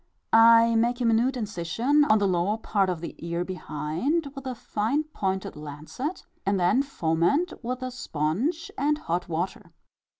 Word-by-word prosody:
I 230 Hz, 0 st, +7 dB
make 240 Hz, +2 st, +2 dB
a 245 Hz, -, 0 dB
minute 235 Hz, +3 st, +2 dB
incision 225 Hz, -, +1 dB
on 220 Hz, -7 st, +5 dB
the 205 Hz, -1 st, +2 dB
lower 185 Hz, +3 st, +1 dB
part 200 Hz, -3 st, 0 dB
of 175 Hz, -3 st, -3 dB
the 170 Hz, -, -6 dB
ear 170 Hz, +1 st, -3 dB
behind, 185 Hz, -, -2 dB
with 275 Hz, -2 st, -8 dB
a 255 Hz, -, -3 dB
fine 230 Hz, +6 st, -1 dB
pointed 190 Hz, -11 st, -3 dB
lancet, 155 Hz, -, -6 dB, 0.2 s
and 195 Hz, -1 st, +1 dB
then 180 Hz, +9 st, +3 dB
foment 175 Hz, -, 0 dB
with 255 Hz, +2 st, -3 dB
a 255 Hz, -, -3 dB
sponge 245 Hz, -, -2 dB
and 295 Hz, +2 st, +2 dB
hot 175 Hz, -, -3 dB
water. 175 Hz, +3 st, -3 dB
220 Hz, 160 wpm, -26 LUFS, 175-260 Hz, 0.2 s, I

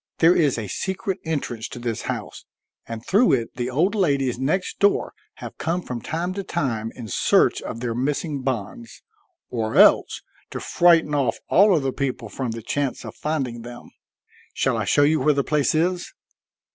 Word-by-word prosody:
There 170 Hz, +2 st, +5 dB
is 145 Hz, -7 st, +2 dB
a 110 Hz, -3 st, -4 dB
secret 190 Hz, -, -3 dB
entrance 135 Hz, -8 st, -3 dB
to -, -, -9 dB
this 120 Hz, -2 st, -3 dB
house, -, -, -5 dB, 0.4 s
and 115 Hz, 0 st, -7 dB
through 220 Hz, +6 st, +4 dB
it 115 Hz, -3 st, -1 dB
the 120 Hz, 0 st, -2 dB
old 165 Hz, +10 st, +1 dB
ladies 140 Hz, -, +1 dB
next 155 Hz, +8 st, -1 dB
door, 200 Hz, 0 st, +2 dB, 0.2 s
have -, -, -10 dB
come 175 Hz, +2 st, -1 dB
from 120 Hz, -2 st, -5 dB
time 170 Hz, +7 st, -3 dB
to 200 Hz, +1 st, -4 dB
time 115 Hz, -10 st, -2 dB
in 120 Hz, -3 st, -8 dB
search 100 Hz, -, +2 dB
of 115 Hz, -, -6 dB
their 120 Hz, -2 st, -2 dB
missing 140 Hz, +3 st, -2 dB
bonds, 115 Hz, -3 st, -5 dB, 0.5 s
or 110 Hz, -2 st, -2 dB
else -, -, +5 dB, 0.3 s
to -, -, -5 dB
frighten 165 Hz, -3 st, +3 dB
off 135 Hz, -6 st, +1 dB
all 200 Hz, 0 st, +5 dB
other 135 Hz, -4 st, 0 dB
people 135 Hz, -1 st, -3 dB
from 130 Hz, -3 st, -4 dB
the 115 Hz, 0 st, -6 dB
chance 140 Hz, 0 st, -2 dB
of 110 Hz, -, -7 dB
finding 135 Hz, -7 st, -3 dB
them. 120 Hz, +1 st, -11 dB, 0.6 s
Shall -, -, +1 dB
I -, -, -1 dB
show 145 Hz, -, +3 dB
you 155 Hz, +2 st, +3 dB
where 150 Hz, +2 st, +3 dB
the 140 Hz, -, +1 dB
place 150 Hz, -1 st, +1 dB
is?" 175 Hz, +2 st, 0 dB
140 Hz, 180 wpm, -23 LUFS, 120-165 Hz, 0.6 s, There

